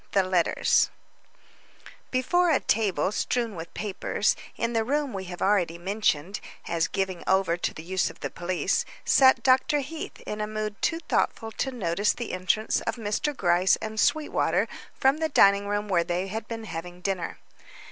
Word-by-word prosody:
THE 195 Hz, -, +4 dB
LETTERS 185 Hz, -2 st, +2 dB, 1.2 s
Before 350 Hz, +8 st, +2 dB
a 300 Hz, -, +4 dB
table 195 Hz, -5 st, +1 dB
strewn 235 Hz, +1 st, -1 dB
with 165 Hz, 0 st, -7 dB
papers, 205 Hz, -3 st, 0 dB, 0.2 s
in 230 Hz, +1 st, -1 dB
the 225 Hz, -1 st, +2 dB
room 285 Hz, +2 st, -1 dB
we 190 Hz, -1 st, -4 dB
have 180 Hz, -1 st, -5 dB
already 185 Hz, -4 st, +2 dB
mentioned 190 Hz, -1 st, -1 dB, 0.3 s
as 165 Hz, -1 st, +1 dB
given 190 Hz, -2 st, -2 dB
over 190 Hz, -3 st, +3 dB
to -, -, -1 dB
the 160 Hz, -, -9 dB
use 185 Hz, +2 st, 0 dB
of -, -, -14 dB
the -, -, -4 dB
police, 175 Hz, 0 st, 0 dB, 0.2 s
sat 260 Hz, -1 st, +5 dB
Dr. 265 Hz, +3 st, +3 dB
Heath 310 Hz, +4 st, -7 dB
in 210 Hz, 0 st, -5 dB
a 210 Hz, -, -1 dB
mood 215 Hz, -1 st, -4 dB
too 335 Hz, -1 st, 0 dB
thoughtful 225 Hz, -7 st, -1 dB
to 265 Hz, -, -2 dB
notice 200 Hz, -3 st, 0 dB
the 240 Hz, -, -5 dB
entrance 185 Hz, +4 st, 0 dB
of -, -, 0 dB
Mr. 235 Hz, +6 st, -2 dB
Gryce 175 Hz, +1 st, +3 dB
and 220 Hz, 0 st, -5 dB
Sweetwater 300 Hz, +4 st, +2 dB, 0.3 s
from 270 Hz, +2 st, +3 dB
the 320 Hz, 0 st, -1 dB
dining 200 Hz, -6 st, +5 dB
room 205 Hz, +1 st, -1 dB
where 180 Hz, -4 st, +2 dB
they 180 Hz, +3 st, -2 dB
had 220 Hz, +2 st, -5 dB
been 225 Hz, -1 st, -5 dB
having 175 Hz, -2 st, -7 dB
dinner. 185 Hz, -2 st, -2 dB
205 Hz, 170 wpm, -26 LUFS, 185-240 Hz, 1.2 s, sat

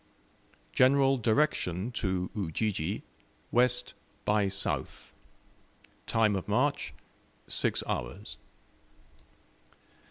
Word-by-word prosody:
General 135 Hz, +1 st, +5 dB
direction 110 Hz, -, +1 dB
to 95 Hz, -6 st, -1 dB
Ujiji, 100 Hz, -1 st, -1 dB, 0.5 s
west 125 Hz, 0 st, +2 dB, 0.3 s
by 105 Hz, -1 st, +3 dB
south. 100 Hz, +1 st, -2 dB, 0.9 s
Time 110 Hz, -2 st, +3 dB
of 95 Hz, -, -3 dB
march, -, -, +1 dB, 0.6 s
six -, -, +1 dB
hours. -, -, -4 dB
105 Hz, 70 wpm, -30 LUFS, 95-125 Hz, 0.9 s, General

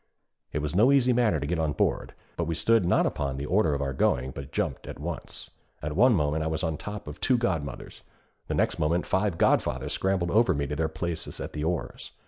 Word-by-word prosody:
It 75 Hz, -, -2 dB
was 75 Hz, +2 st, -2 dB
no 115 Hz, +8 st, +5 dB
easy 130 Hz, -3 st, +4 dB
matter 115 Hz, -9 st, +2 dB
to 70 Hz, -, -3 dB
get 85 Hz, +3 st, -1 dB
on 80 Hz, -2 st, 0 dB
board, -, -, -1 dB, 0.2 s
but 85 Hz, -, -1 dB
we 85 Hz, -, -1 dB
stood 110 Hz, +5 st, +3 dB
not -, -, +3 dB
upon 70 Hz, -2 st, -2 dB
the 70 Hz, -, -4 dB
order 85 Hz, -3 st, +2 dB
of 70 Hz, -, -1 dB
our 70 Hz, -1 st, -2 dB
going 65 Hz, 0 st, +1 dB
but 70 Hz, +1 st, -8 dB
jumped -, -, -2 dB
at -, -, -7 dB
once. 80 Hz, +2 st, -6 dB, 0.3 s
At 75 Hz, 0 st, -4 dB
one 120 Hz, +4 st, +5 dB
moment 75 Hz, -1 st, +1 dB
I -, -, -1 dB
was 80 Hz, +1 st, -2 dB
on 80 Hz, -2 st, 0 dB
top 105 Hz, +2 st, -7 dB
of 75 Hz, -, -8 dB
two 130 Hz, -, +3 dB
godmothers, 80 Hz, -, -3 dB, 0.5 s
the -, -, -1 dB
next -, -, +1 dB
moment 85 Hz, +3 st, +1 dB
five 95 Hz, -2 st, 0 dB
godfathers -, -, +1 dB
scrambled 95 Hz, -3 st, 0 dB
over 115 Hz, -3 st, +4 dB
me 70 Hz, 0 st, -1 dB
to 75 Hz, +1 st, -3 dB
their 80 Hz, +1 st, 0 dB
places 80 Hz, 0 st, -4 dB
at -, -, -6 dB
the 75 Hz, -, -3 dB
oars. 85 Hz, +1 st, -3 dB
80 Hz, 230 wpm, -27 LUFS, 75-95 Hz, 0.5 s, no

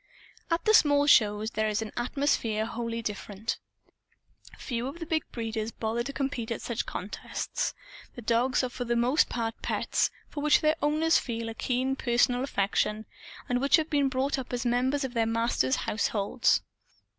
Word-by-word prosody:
At 335 Hz, 0 st, 0 dB
the 435 Hz, -, +5 dB
small 290 Hz, -6 st, +5 dB
shows, 215 Hz, -5 st, +4 dB
there 215 Hz, 0 st, 0 dB
is 215 Hz, +1 st, 0 dB
an 215 Hz, -, -8 dB
atmosphere 240 Hz, -4 st, 0 dB
wholly 230 Hz, 0 st, -4 dB
different. 210 Hz, +1 st, -4 dB, 1.0 s
Few 240 Hz, -1 st, -3 dB
of 280 Hz, +5 st, -6 dB
the 335 Hz, -, -6 dB
big 315 Hz, -2 st, -2 dB
breeders 225 Hz, -1 st, -3 dB
bother 225 Hz, +1 st, -2 dB
to 240 Hz, -, -4 dB
compete 270 Hz, -5 st, -3 dB
at 230 Hz, -, -4 dB
such 235 Hz, 0 st, -3 dB
contests. 200 Hz, +3 st, -4 dB, 0.4 s
The 245 Hz, -, -8 dB
dogs 240 Hz, +4 st, +2 dB
are 255 Hz, -, -1 dB
for 245 Hz, -, -5 dB
the 235 Hz, 0 st, 0 dB
most 245 Hz, +6 st, +3 dB
part 225 Hz, -1 st, -3 dB
pets, -, -, 0 dB, 0.2 s
for 290 Hz, -, -6 dB
which 300 Hz, 0 st, +4 dB
their 310 Hz, +1 st, +3 dB
owners 310 Hz, +2 st, +3 dB
feel 230 Hz, -2 st, -4 dB
a -, -, -5 dB
keen 255 Hz, +3 st, -1 dB
personal 245 Hz, 0 st, +2 dB
affection, 210 Hz, -2 st, 0 dB, 0.4 s
and 245 Hz, 0 st, 0 dB
which 275 Hz, -, +5 dB
have 320 Hz, -1 st, 0 dB
been 285 Hz, -2 st, +3 dB
brought 265 Hz, +2 st, 0 dB
up 255 Hz, -, -7 dB
as 245 Hz, +1 st, -2 dB
members 255 Hz, +4 st, +1 dB
of 260 Hz, -2 st, -4 dB
their 230 Hz, -2 st, +1 dB
masters' 225 Hz, -, +1 dB
households. 215 Hz, +2 st, +1 dB
240 Hz, 175 wpm, -28 LUFS, 225-275 Hz, 1.0 s, the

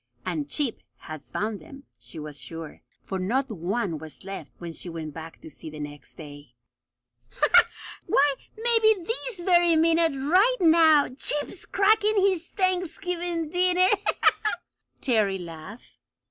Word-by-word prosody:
And 155 Hz, -5 st, -3 dB
Chip 275 Hz, -, 0 dB, 0.2 s
had 155 Hz, -2 st, -9 dB
found 215 Hz, -1 st, -4 dB
them, 275 Hz, -4 st, -13 dB, 0.2 s
she -, -, -10 dB
was 150 Hz, -2 st, -7 dB
sure, 165 Hz, -2 st, -8 dB, 0.2 s
for 190 Hz, -, -4 dB
not 250 Hz, +8 st, -1 dB
one 185 Hz, -2 st, -2 dB
was 155 Hz, -1 st, -11 dB
left 195 Hz, 0 st, -7 dB
when 170 Hz, -1 st, -7 dB
she 175 Hz, -, -4 dB
went 160 Hz, -3 st, -6 dB
back 160 Hz, +1 st, -9 dB
to -, -, -11 dB
see, 155 Hz, -, -10 dB
the 155 Hz, 0 st, -10 dB
next 145 Hz, -2 st, -8 dB
day. 145 Hz, -5 st, -12 dB, 1.5 s
"Why, 285 Hz, +1 st, +3 dB, 0.2 s
maybe 450 Hz, -1 st, +4 dB
this 455 Hz, 0 st, -3 dB
very 345 Hz, -2 st, +4 dB
minute 325 Hz, 0 st, +3 dB
right 375 Hz, -, +3 dB
now 320 Hz, -3 st, +5 dB
Chip's 295 Hz, +7 st, -1 dB
cracking 425 Hz, +2 st, +3 dB
his 375 Hz, -3 st, +1 dB
Thanksgiving 355 Hz, -3 st, -2 dB
dinner!" 365 Hz, +1 st, +3 dB, 1.1 s
Terry 215 Hz, -6 st, +1 dB
laughed. 175 Hz, +5 st, -11 dB
275 Hz, 130 wpm, -25 LUFS, -, 1.5 s, now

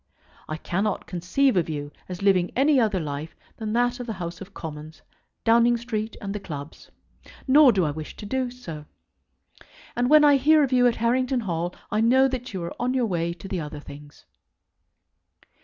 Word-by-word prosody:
I 155 Hz, -, -3 dB
cannot 195 Hz, +5 st, -2 dB
conceive 195 Hz, +9 st, +1 dB
of 170 Hz, -3 st, +1 dB
you 145 Hz, -1 st, -4 dB, 0.2 s
as 180 Hz, +1 st, -6 dB
living 185 Hz, -3 st, +3 dB
any 275 Hz, +1 st, +4 dB
other 215 Hz, -5 st, +1 dB
life 150 Hz, 0 st, -5 dB, 0.2 s
than 220 Hz, -2 st, -4 dB
that 245 Hz, +1 st, +1 dB
of 245 Hz, -, -6 dB
the 225 Hz, -, -3 dB
House 170 Hz, 0 st, -6 dB
of 195 Hz, +1 st, -9 dB
Commons, 155 Hz, -3 st, -9 dB, 0.4 s
Downing 235 Hz, +1 st, +4 dB
Street, 225 Hz, -2 st, -4 dB
and 200 Hz, -1 st, -5 dB
the 210 Hz, -, -4 dB
clubs. 150 Hz, -5 st, -9 dB, 0.6 s
Nor 280 Hz, 0 st, +7 dB
do 190 Hz, -5 st, +1 dB
I 150 Hz, -, 0 dB
wish 155 Hz, +1 st, -7 dB
to -, -, -9 dB
do 255 Hz, +4 st, -1 dB
so. 165 Hz, -12 st, -9 dB, 1.1 s
And 245 Hz, +1 st, +1 dB
when 305 Hz, 0 st, +7 dB
I 290 Hz, -1 st, +6 dB
hear 305 Hz, +3 st, +5 dB
of 265 Hz, -2 st, -1 dB
you 245 Hz, -1 st, +5 dB
at 240 Hz, -, +1 dB
Harrington 250 Hz, +2 st, +1 dB
Hall 175 Hz, -3 st, -3 dB, 0.2 s
I 215 Hz, +1 st, +1 dB
know 260 Hz, +4 st, +5 dB
that 255 Hz, -1 st, -5 dB
you 185 Hz, -4 st, -4 dB
are 170 Hz, -, -5 dB
on 250 Hz, +1 st, 0 dB
your 250 Hz, -2 st, +2 dB
way 170 Hz, -4 st, -1 dB
to 185 Hz, -, -10 dB
the 190 Hz, -2 st, -3 dB
other 150 Hz, -1 st, -7 dB
things. 145 Hz, 0 st, -13 dB
210 Hz, 190 wpm, -25 LUFS, 170-250 Hz, 1.1 s, Nor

